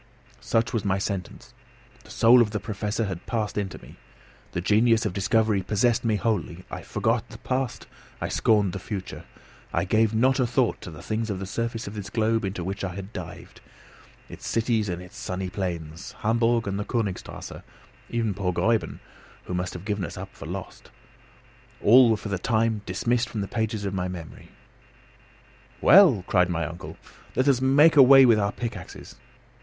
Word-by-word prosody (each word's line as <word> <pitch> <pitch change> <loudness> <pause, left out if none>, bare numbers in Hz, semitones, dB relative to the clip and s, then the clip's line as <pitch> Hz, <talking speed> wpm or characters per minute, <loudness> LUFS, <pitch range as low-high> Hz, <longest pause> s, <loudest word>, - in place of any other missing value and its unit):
Such 115 0 0
was 115 -4 -1
my 95 -1 +1
sentence! 100 -2 -5 0.5
The - - -16
soul 120 +2 +6
of 115 - +2
the 105 0 -3
Professor 105 +1 -3
had 95 -3 -6
passed 110 -3 -2
into 100 -3 -3
me. - - -14 0.6
The - - -1
genius 110 +5 +3
of 100 - -1
discovery 105 +1 +1
possessed 110 +5 +1
me 115 -2 +1
wholly. 95 -4 -2
I - - -5
forgot - - -1
the - - -10
past, 130 -1 -3 0.3
I - - -2
scorned 105 -5 +2
the 100 - -4
future. 95 0 -6 0.5
I - - 0
gave 110 0 +2
not 130 +4 +3
a 125 - +2
thought 120 0 0
to - - -8
the 80 -3 -11
things 110 +1 -2
of 100 - -2
the 95 - -5
surface 115 +3 -3
of 100 - -7
this 105 -2 -6
globe 110 +1 +1
into 95 -2 -4
which 95 +3 -4
I 90 -2 -4
had 100 +2 -8
dived; 90 -5 -9 0.7
its - - -9
cities 115 -3 0
and 90 0 -4
its 90 - -14
sunny 95 0 -4
plains, 85 -4 -5
Hamburg 115 +1 +2
and 100 0 -2
the 105 - -3
Königstrasse, 105 -7 -4 0.5
even 115 -3 -1
poor 95 -1 -1
Gräuben, 110 +5 0 0.5
who - - -6
must 90 0 -2
have 90 +2 -8
given 105 -2 -2
us 85 - -6
up 95 +1 -8
for - - -10
lost, - - -8 0.9
all 120 +2 +7
were 110 - +2
for 105 - -7
the 100 -2 -2
time 110 0 +1
dismissed 115 +6 0
from 110 - -4
the 100 - -3
pages 110 -1 -2
of 100 - -2
my 90 -1 -2
memory. 85 -3 -9 1.3
"Well," 165 - +6
cried 90 -2 +2
my 85 -1 -1
uncle, 85 +1 -8 0.4
"let 130 - +1
us 130 -3 +3
make 145 +5 +5
a 145 - +9
way 135 0 +8
with 115 -3 +5
our 100 0 0
pickaxes." 105 -7 -7
105 Hz, 185 wpm, -25 LUFS, 95-115 Hz, 1.3 s, a